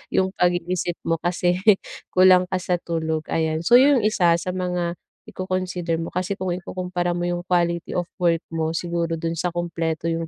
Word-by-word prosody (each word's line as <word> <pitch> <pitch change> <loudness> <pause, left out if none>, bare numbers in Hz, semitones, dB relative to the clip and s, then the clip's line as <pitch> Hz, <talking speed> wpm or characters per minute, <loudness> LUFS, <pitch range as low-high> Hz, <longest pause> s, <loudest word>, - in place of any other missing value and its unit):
yung 190 - +3
pag-iisip 175 0 0
mo 165 - +2
kasi 175 0 +1 0.6
kulang 185 0 +6
ka 185 - -1
sa 180 0 0
tulog, 160 -2 -2
ayan. 160 0 0
So 240 +7 +7
yung 270 -4 +5
isa 180 -6 +3
sa 180 +2 -3
mga 180 -1 -2 0.3
iko-consider 185 -2 -3
mo 165 0 -4
kasi 185 +2 -2
kung 185 -2 -3
ikukumpara 180 0 -3
mo 175 - -2
yung 175 0 -2
quality 170 -1 0
of 175 -1 -2
work 170 -2 +2
mo 160 0 -1
siguro 170 -1 -1
dun 165 0 -3
sa 175 0 -2
kumpleto 165 -1 -2
yung 165 0 -2
175 Hz, 175 wpm, -23 LUFS, 165-180 Hz, 0.6 s, So